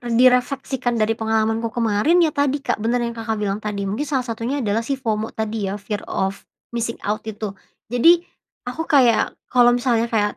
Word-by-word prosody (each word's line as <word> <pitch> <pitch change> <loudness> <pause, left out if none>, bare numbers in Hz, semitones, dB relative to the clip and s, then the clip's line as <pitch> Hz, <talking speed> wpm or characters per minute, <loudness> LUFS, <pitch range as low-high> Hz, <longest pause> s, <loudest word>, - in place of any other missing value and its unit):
direfleksikan 250 +1 +2
dari 225 0 +1
pengalamanku 220 +1 0
kemarin, 235 +10 +3
ya 315 - +3
tadi, 285 -1 0
Kak, - - -1
bener 235 +3 0
yang 235 0 -3
Kakak 220 -1 -2
bilang 200 0 -1
tadi. 210 -2 -4
Mungkin 215 +10 -2
salah 270 -3 0
satunya 240 +4 -3
adalah 215 +1 0
si 275 - 0
FOMO 220 -4 -3
tadi 220 -2 -2
ya, 195 - -2
fear 205 0 -5
of 195 +1 -3 0.2
missing 230 -1 -2
out, 210 +2 -1
itu. 215 -1 -4 0.4
Jadi 335 +8 +5 0.5
aku 320 +6 -4
kayak, 250 -7 +4
kalau 245 -1 +5
misalnya 240 -2 +1
kayak 210 -3 0
230 Hz, 180 wpm, -21 LUFS, 215-255 Hz, 0.5 s, Jadi